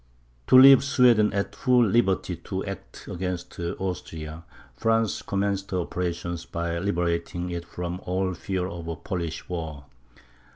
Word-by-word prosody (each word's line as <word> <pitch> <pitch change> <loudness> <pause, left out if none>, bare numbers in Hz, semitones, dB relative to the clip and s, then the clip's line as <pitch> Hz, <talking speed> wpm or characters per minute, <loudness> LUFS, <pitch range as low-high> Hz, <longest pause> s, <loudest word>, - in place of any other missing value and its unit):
To 130 - +7
leave 135 +1 +9
Sweden 125 -6 +4
at 100 0 -2
full 125 -2 +4
liberty 95 -4 +1
to - - -5
act - - -8
against 90 -1 -5
Austria, 85 -3 -5 0.3
France 115 - +1
commenced 100 0 -1
her 90 -1 0
operations 85 -1 -3
by 85 0 -3
liberating 85 -1 -1
it 85 0 -4
from 90 +1 -5
all 95 +1 0
fear 95 +1 -3
of 85 -3 -6
a 85 - -3
Polish 85 -1 -5
war. 80 -5 -5
90 Hz, 135 wpm, -26 LUFS, 85-100 Hz, 0.3 s, leave